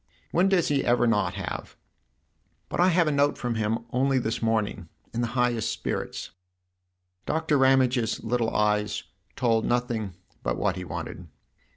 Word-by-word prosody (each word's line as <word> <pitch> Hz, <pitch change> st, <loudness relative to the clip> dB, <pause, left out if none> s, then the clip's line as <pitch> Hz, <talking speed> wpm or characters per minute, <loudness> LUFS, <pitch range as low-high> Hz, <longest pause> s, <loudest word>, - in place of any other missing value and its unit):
" -, -, -36 dB
When 185 Hz, +3 st, +3 dB
does 185 Hz, -4 st, +3 dB
he 140 Hz, -2 st, +2 dB
ever 120 Hz, 0 st, +3 dB
not 105 Hz, -6 st, +1 dB
have? 100 Hz, -2 st, -5 dB, 0.9 s
But -, -, -4 dB
I 180 Hz, -, +6 dB
had 175 Hz, -2 st, +3 dB
a -, -, +2 dB
note 145 Hz, 0 st, +2 dB
from 120 Hz, -1 st, -2 dB
him 110 Hz, +1 st, -1 dB
only 135 Hz, +2 st, +2 dB
this 115 Hz, -2 st, -1 dB
morning 110 Hz, -5 st, -1 dB, 0.2 s
in 115 Hz, -, -1 dB
the 120 Hz, -, +1 dB
highest 120 Hz, -3 st, +1 dB
spirits." -, -, -4 dB, 1.0 s
Doctor 160 Hz, -1 st, +1 dB
Ramage's 130 Hz, -3 st, +3 dB
little 115 Hz, 0 st, +1 dB
eyes 105 Hz, -1 st, +1 dB, 0.3 s
told 115 Hz, -3 st, +2 dB
nothing 120 Hz, -6 st, -1 dB, 0.3 s
but -, -, -1 dB
what 100 Hz, -3 st, 0 dB
he 90 Hz, -, -5 dB
wanted. 85 Hz, +1 st, -6 dB
115 Hz, 160 wpm, -26 LUFS, 105-130 Hz, 1.0 s, I